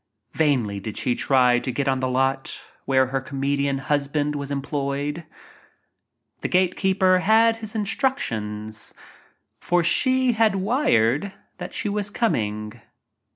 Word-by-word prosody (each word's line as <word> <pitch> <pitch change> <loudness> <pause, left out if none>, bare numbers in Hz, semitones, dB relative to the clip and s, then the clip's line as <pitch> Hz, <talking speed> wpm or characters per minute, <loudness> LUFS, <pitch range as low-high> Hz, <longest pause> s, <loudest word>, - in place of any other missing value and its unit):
Vainly 125 -10 +1
did 105 +2 -7
she 125 - +1
try 125 -2 +3
to 130 - -3
get 135 +3 -2
on 135 -1 +1
"lot" 135 +1 -1 0.3
where 130 -1 +3
her 135 +1 -2
comedian 140 +1 -1
husband 145 +1 -1
was 140 -1 -4
em 140 -1 -2
ployed. 145 +3 -3 1.1
The - - -2
gate 185 0 +2
keeper 190 -1 +3
had 225 +4 +4
his 220 -1 -7
instructions 110 - -2 0.3
— - - -33 0.3
for 175 0 +1
she 260 +7 +3
had 220 -3 +2
wired 190 - +1 0.3
that 180 +1 -7
she - - -2
was 205 0 -2
coming. 110 - -2
145 Hz, 135 wpm, -23 LUFS, 130-195 Hz, 1.1 s, had